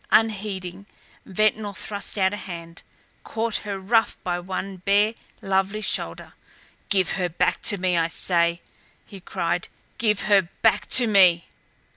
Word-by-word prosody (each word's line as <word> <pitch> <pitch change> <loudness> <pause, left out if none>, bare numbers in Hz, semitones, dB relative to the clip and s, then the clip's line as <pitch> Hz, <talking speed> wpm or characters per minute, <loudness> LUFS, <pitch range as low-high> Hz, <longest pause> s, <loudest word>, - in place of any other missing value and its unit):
Unheeding, 200 -3 0 0.4
Ventnor 215 +1 0
thrust 205 +1 -4
out 190 0 +2
a - - -3
hand, 170 -3 -9 0.4
caught 225 0 -1
her 205 -2 -5
roughly 225 +4 +1
by 175 -1 -1
one 190 +1 -5
bare, 205 +4 +2 0.3
lovely 195 +2 0
shoulder. - - -2 0.6
"Give 190 -4 +2
her 180 -2 -1
back 170 - 0
to 205 - +3
me, 180 -1 0
I 165 -1 +2
say!" 170 0 0 0.4
he 200 - -11
cried. 170 -1 -2 0.3
"Give 210 -3 +1
her 195 -4 +3
back 225 - +3
to 250 - +5
me!" 185 -6 +5
195 Hz, 140 wpm, -24 LUFS, 180-210 Hz, 0.6 s, to